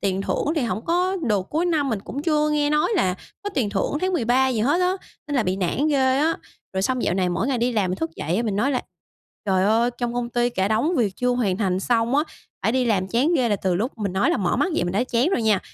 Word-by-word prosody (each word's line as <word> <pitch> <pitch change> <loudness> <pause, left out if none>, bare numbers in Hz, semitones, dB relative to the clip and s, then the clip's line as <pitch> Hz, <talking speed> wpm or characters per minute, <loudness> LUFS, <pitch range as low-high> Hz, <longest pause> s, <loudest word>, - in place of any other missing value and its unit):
tiền 195 -1 -1
thưởng - - -1
thì 290 - +1
hổng 225 -1 -2
có 360 +3 +1
được. 205 -8 0
Cuối 325 +4 0
năm 310 -5 +1
mình 220 -5 -1
cũng 275 +8 -6
chưa 300 -1 +2
nghe 295 -1 +1
nói 300 +8 +2
là 185 - +2 0.3
có 410 - -3
tiền 230 -7 0
thưởng 205 +8 -1
tháng 370 0 0
13 260 -3 +2
gì 240 -4 -1
hết 290 +10 +2
á, 365 +1 +2 0.3
nên 290 - -2
là 245 - +3
bị 185 -1 -1
nản 195 - 0
ghê 265 -3 +2
á! 320 +3 +2 0.4
Rồi 190 0 -1
xong 255 +4 0
dạo - - +1
này 185 -1 +1
mỗi 180 +7 -1
ngày 260 -3 0
đi 245 +1 +1
làm 200 -5 +1
mình 185 - -2
thức 160 -3 -3
dậy 165 +5 -1
á, 230 - +1
mình 210 -4 -1
nói 245 +7 +1
là 255 - -1 0.6
''Trời 190 -1 +2
ơi, 230 +4 +3
trong 240 -1 -2
công 245 -1 -2
ty 240 0 +1
cả 190 -3 0
đống 235 +11 +1
việc 205 -6 0
chưa 250 - 0
hoàn 220 -7 0
thành 190 -3 0
xong 235 +2 +1
á, 295 - +3 0.4
phải 220 - +1
đi 255 0 +2
làm 190 -4 +1
chán 255 - +2
ghê!'', 255 -5 +2
là 205 - +1
từ 185 -2 -1
lúc 225 +9 -1
mình 200 -4 -2
nói 190 - +2
là - - +2
mở 190 -4 0
mắt 380 - +1
dậy 175 - 0
mình 175 - -2
đã 210 +6 +1
chán 250 +3 +1
rồi 245 - 0
nha, 215 -3 +3
235 Hz, 285 wpm, -23 LUFS, 195-285 Hz, 0.6 s, là